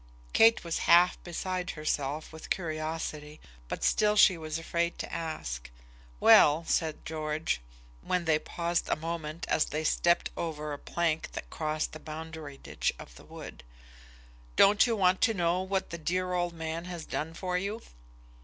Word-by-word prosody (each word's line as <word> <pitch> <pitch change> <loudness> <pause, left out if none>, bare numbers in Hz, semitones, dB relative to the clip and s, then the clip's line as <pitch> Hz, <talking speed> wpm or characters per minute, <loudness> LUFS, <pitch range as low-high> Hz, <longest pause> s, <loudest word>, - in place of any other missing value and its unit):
Kate 225 0 +6
was 170 -1 -2
half 175 +1 +6
beside 180 +1 -3
herself 150 0 -2
with 160 - -10
curiosity, 155 -2 -3 0.3
but - - -5
still 210 0 +3
she 195 -3 +7
was 155 -1 -4
afraid 170 +1 -1
to - - -6
ask. - - -4 0.5
"Well," 155 - +7
said 160 -2 -1
George, 155 - -2 0.4
when 180 - -1
they 155 -2 +3
paused 170 +1 -2
a - - +3
moment 165 0 -5
as 155 - +2
they 155 +1 -3
stepped 170 +2 +2
over 150 -3 -4
a 145 - -6
plank 165 -2 -1
that - - -7
crossed 155 0 -2
the 155 - -9
boundary 155 -2 -8
ditch - - -2
of - - -11
the - - -14
wood: - - -10 0.9
"don't 205 +4 +6
you 230 - +1
want 185 -2 +3
to 225 -2 +3
know 175 0 +1
what 190 0 -2
that 170 -1 -7
dear 180 +2 0
old 175 -1 0
man 165 +1 -4
has 175 -3 -6
done 160 +2 -4
for 180 0 -3
you?" 200 +5 -2
165 Hz, 165 wpm, -30 LUFS, 155-180 Hz, 0.9 s, she